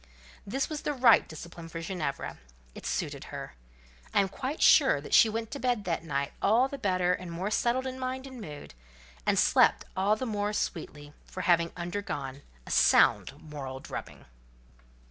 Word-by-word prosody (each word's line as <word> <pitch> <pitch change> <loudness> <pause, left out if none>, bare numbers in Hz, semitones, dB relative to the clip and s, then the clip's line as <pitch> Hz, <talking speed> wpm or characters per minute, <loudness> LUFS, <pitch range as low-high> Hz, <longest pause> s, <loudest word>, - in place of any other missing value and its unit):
This 270 +7 -1
was 305 -2 -5
the 295 - -1
right 245 -4 +5
discipline 165 +1 -9
for 165 - -6
Ginevra; 165 -5 -4 0.3
it - - -8
suited - - -3
her. - - -7 0.6
I - - +6
am 195 - -1
quite 270 +9 -4
sure - - +6
she 225 - +7
went 225 0 -4
to 280 - -5
bed 245 -5 0
that 170 -4 -2
night 140 -3 -2
all 230 +6 +4
the 280 0 -7
better 185 -5 +1
and 180 -1 -5
more 185 +5 -3
settled 245 +4 +1
in 260 0 -5
mind 260 +1 -3
and 260 -3 -9
mood, 150 - -9 0.5
and - - +3
slept - - +4
all 195 +3 +2
the 255 - -4
more 210 -2 -1
sweetly 145 -6 -4
for 185 - -6
having 170 -2 +3
undergone 170 -7 -4 0.2
a - - -8
sound - - +4
moral 140 -4 -7
drubbing. - - -8
195 Hz, 170 wpm, -29 LUFS, 165-245 Hz, 0.6 s, she